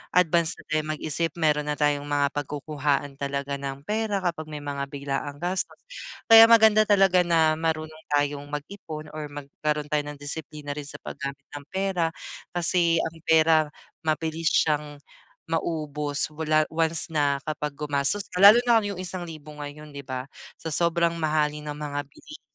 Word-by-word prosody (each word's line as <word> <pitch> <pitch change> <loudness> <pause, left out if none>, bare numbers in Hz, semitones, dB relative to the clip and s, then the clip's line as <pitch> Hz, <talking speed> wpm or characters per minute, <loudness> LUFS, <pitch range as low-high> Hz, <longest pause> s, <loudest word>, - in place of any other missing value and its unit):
advance 170 -2 +4
na - - -14
tayong 155 0 -1
mag-isip 160 +2 0
meron 150 -3 +1
na 150 - -1
tayong 145 -1 0
mga 145 -1 +1
pagkukuhaan 145 0 -2
talaga 140 0 -3
ng 135 0 -6
pera 215 -1 -1
kapag 165 -3 -3
may 150 -1 -7
mga 140 -1 -4
biglaang 140 0 -4
gastos. 185 +1 +1 0.5
Kaya 225 0 +11
maganda 220 -2 +5
talaga 195 -3 +4
na 165 -2 +3
marunong 155 -1 -4
tayong 145 0 -1
mag-ipon 155 0 -8
or 155 -1 -5
magkaroon 150 +1 -4
tayo 150 -1 +2
ng 145 - -7
disiplina 145 0 -2
rin 145 -1 -6
sa - - -1
paggamit 140 -1 -7
ng 145 -1 -8
pera 190 -3 -1 0.5
kasi 170 -1 +4
ang 165 0 -5
pera 160 -1 +4 0.4
mabilis 160 +1 0
siyang 150 -1 0 0.5
maubos. 150 -3 0
Wala 155 0 +1
once 165 +1 +2
na 145 -2 +1
kapag 150 -2 -4
gumastos 145 +6 +2
ka 180 - -2
lalo 205 +3 +9
na 235 -2 +5
kung 205 -1 -4
yung 180 - -6
1,000 165 -5 -5
ngayon, 150 +1 -9
di 140 - -8
ba, 130 -1 -5 0.3
sa 160 - -6
sobrang 170 +1 +3
mahalin 150 -1 -1
ng 145 - -6
mga 145 -1 -4
bilihin 305 - -14
155 Hz, 160 wpm, -25 LUFS, 145-170 Hz, 0.5 s, Kaya